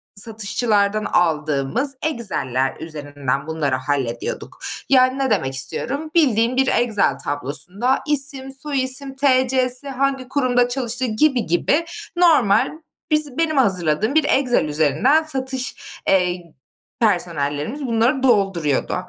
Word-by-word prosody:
satışçılardan 215 0 0
aldığımız 155 - 0
Excel'ler 135 - -1
üzerinden 145 -3 -4
bunları 155 -4 -2
hallediyorduk. 130 -3 -4 0.3
Yani, 255 0 +3
ne 270 -1 0
demek 135 - -1
istiyorum? 280 - 0
Bildiğin 250 -5 +2
bir 265 0 +2
Excel 230 -6 +1
tablosunda 150 - +1
isim, 275 -2 +1
soy 275 -1 0
isim, 265 +1 0
T.C.si, 260 0 +2
hangi 270 -1 -2
kurumda 250 -3 +1
çalıştığı 245 0 -1
gibi 250 +2 +1
gibi 285 - 0 0.3
normal, 320 - +3 0.4
biz 300 -4 +2
benim 320 -2 0
hazırladığım 195 - +1
bir 315 - +4
Excel 265 - +1
üzerinden 155 - +2
satış, 265 -4 -1 0.3
eee, 180 -3 0 0.5
personellerimiz 175 - -1
bunları 235 +4 0
dolduruyordu. 195 - +1
235 Hz, 110 wpm, -20 LUFS, 160-270 Hz, 0.5 s, bir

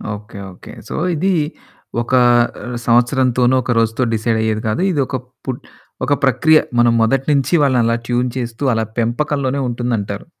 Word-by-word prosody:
Okay. 105 0 -12 0.2
Okay. - - -13 0.2
So, - - -4 0.2
ఇదీ 190 +5 +1 0.7
ఒకా 125 +2 +2 0.5
ఆహ్, 120 0 -5
సంవత్సరంతోనో, 125 +1 +3
ఒక 125 - -2
రోజుతో 115 +2 +1
డిసైడయ్యేది 110 -1 0
కాదు. 110 +11 -1
ఇది 145 -4 0
ఒక 130 - -4 0.3
పుట్ 130 -2 -4 0.4
ఒక 145 - +2
ప్రక్రియ. 150 +4 +4 0.2
మనం 120 -1 +4
మొదటి 135 +4 +1
నించీ 140 +4 +2
వాళ్ళనలా 120 -4 +2
ట్యూన్ 125 +1 0
చేస్తూ, 120 +2 -5
అలా 110 0 0
పెంపకంలోనే 140 +3 -1
ఉంటుందంటారు. 115 -4 -3
120 Hz, 145 wpm, -18 LUFS, 115-135 Hz, 0.7 s, ప్రక్రియ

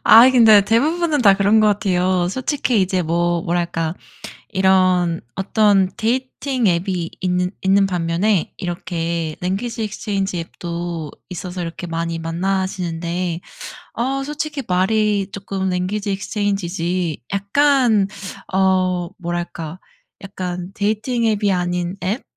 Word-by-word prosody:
아이 235 +4 +8
근데 220 -4 +7
대부분은 300 +7 +2
다 200 -3 +7
그런 205 +2 +4
것 215 - +4
같아요. 185 -3 +1
솔직히 255 0 0
이제 185 -1 +1
뭐 170 +1 0
뭐랄까 170 -1 -1 0.6
이런 185 -3 +3
어떤 195 -1 +3
데이팅 255 +1 -1
앱이 175 -1 -1
있는 180 -1 0
있는 195 +1 +3
반면에 180 +2 0
이렇게 170 -3 -3
랭귀지 220 +5 -2
익스체인지 195 -3 -2
앱도 170 -2 -5 0.2
있어서 180 +1 -5
이렇게 170 +1 -6
많이 165 0 -2
만나시는데 175 -1 -2 0.5
어 270 +3 -1
솔직히 295 -1 -4
말이 200 +2 +1
쪼끔 195 -1 -3
랭귀지 200 +3 -1
익스체인지 200 -2 -2
지 175 -4 -2
약간 220 0 +3 0.4
어 185 -2 +2
뭐랄까 175 -1 -4 0.4
약간 180 -2 -5
데이팅 220 +4 0
앱이 205 -2 +2
아닌 175 0 -1
앱 205 +8 -1
190 Hz, 265 characters per minute, -20 LUFS, 175-210 Hz, 0.6 s, 아이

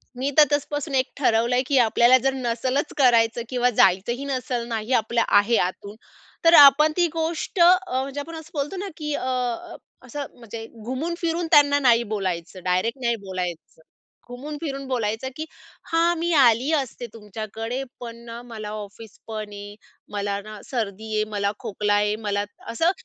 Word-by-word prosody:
मी 265 +3 -1
तर 305 - +10
तसपासून 290 0 -1
एक 260 0 +1
ठरवलंय 245 -2 +2
की 275 -1 +2
आपल्याला 240 +1 +5
जर 270 +1 0
नसलच 255 +3 -2
करायचं 235 -3 +4
किंवा 250 -1 +2
जायचंही 220 +4 +2
नसलं 250 -3 -3
नाही 225 +1 -3
आपल्या 230 0 +2
आहे 215 +3 +3
आतून. 200 +3 -3 0.5
तर 330 - +7
आपण 290 +1 +8
ती 350 -1 +4
गोष्ट 330 +3 -3
अ, 355 -6 +4
म्हणजे 275 +1 -5
आपण 325 +3 -7
असं 320 0 -10
बोलतो 295 +6 -3
ना 400 - -4
की 300 -2 -3
अ, 255 - -3 0.8
असं 290 -1 -5
म्हणजे 230 -1 -8 0.2
घुमून 270 +8 -3
फिरून 335 0 -1
त्यांना 285 -2 +6
नाही 240 -4 +4
बोलायचं, 185 -2 -4
डायरेक्ट 185 +8 0
नाही 235 -1 +2
बोलायचं. 180 -4 -6 0.5
घुमून 285 +5 -7
फिरून 275 -4 -4
बोलायचं 230 -1 -2
की 315 - -5 0.5
"हां! 335 +1 +3
मी 340 +1 -1
आली 255 +1 +4
असते 265 -4 -2
तुमच्याकडे, 225 +4 -5 0.2
पण 235 -1 -7
ना 235 0 -8
मला 220 -3 -7
ऑफिसपण 215 +1 -8
आहे 205 0 -9 0.4
मला 200 0 -2
ना 215 0 -10
सर्दी 220 -3 -4
आहे, 215 - +2
मला 200 -1 0
खोकला 210 -2 -1
आहे 210 +1 +2
मला 205 0 0 0.3
असं 325 +9 +2
240 Hz, 160 wpm, -23 LUFS, 215-285 Hz, 0.8 s, तर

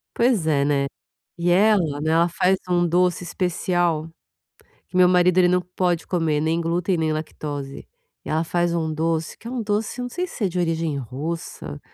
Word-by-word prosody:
Pois 235 -9 +2
é, 140 -3 +2
né, 140 -1 +1 0.5
e 170 +1 0
ela, 180 -7 +3
né, 155 - 0
ela 165 +1 +4
faz 185 +2 +2
um 175 -1 +2
doce 180 +1 +2
especial, 175 -2 -1 0.8
que 180 - -4
meu 180 -1 +7
marido 180 0 +4
ele 180 - +6
não 180 0 +2
pode 180 -1 -1
comer 160 -4 0
nem 160 +2 +1
glúten 170 +2 0
nem 160 -1 0
lactose, 145 -3 -6 0.4
ela 160 +1 0
faz 175 +1 0
um 160 -2 -1
doce 160 +1 -1
que 230 - -11
é 240 - -5
um 250 - -2
doce 210 +3 -2
eu 250 - -2
não 245 - -4
sei 360 +8 -2
se 225 - -3
é - - +1
de 180 - -5
origem 165 -3 0
russa, 135 - -5
170 Hz, 190 wpm, -23 LUFS, 155-180 Hz, 0.8 s, meu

